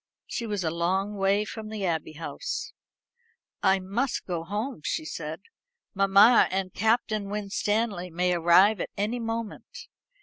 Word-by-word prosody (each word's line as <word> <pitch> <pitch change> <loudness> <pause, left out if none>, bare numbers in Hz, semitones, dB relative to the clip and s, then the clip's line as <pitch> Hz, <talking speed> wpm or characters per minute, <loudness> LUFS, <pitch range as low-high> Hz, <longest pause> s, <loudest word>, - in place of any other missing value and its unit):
She 235 - -4
was 205 -3 -2
a 160 - 0
long 185 +5 0
way 200 +1 +2
from 215 0 -7
the 215 -3 -3
Abbey 160 -3 -2
House. 160 +2 -5 0.9
"I 190 - +4
must 205 +8 -2
go 170 -3 -3
home," 210 - -4
she 155 - -2
said; 155 +2 -6 0.5
"mamma 195 +4 +6
and 185 -1 -2
Captain 220 -2 +1
Winstanley 205 -1 -1
may 180 +2 +1
arrive 175 +5 +5
at - - -3
any 215 +5 -1
moment. 225 -2 -5
195 Hz, 140 wpm, -27 LUFS, 180-215 Hz, 0.9 s, mamma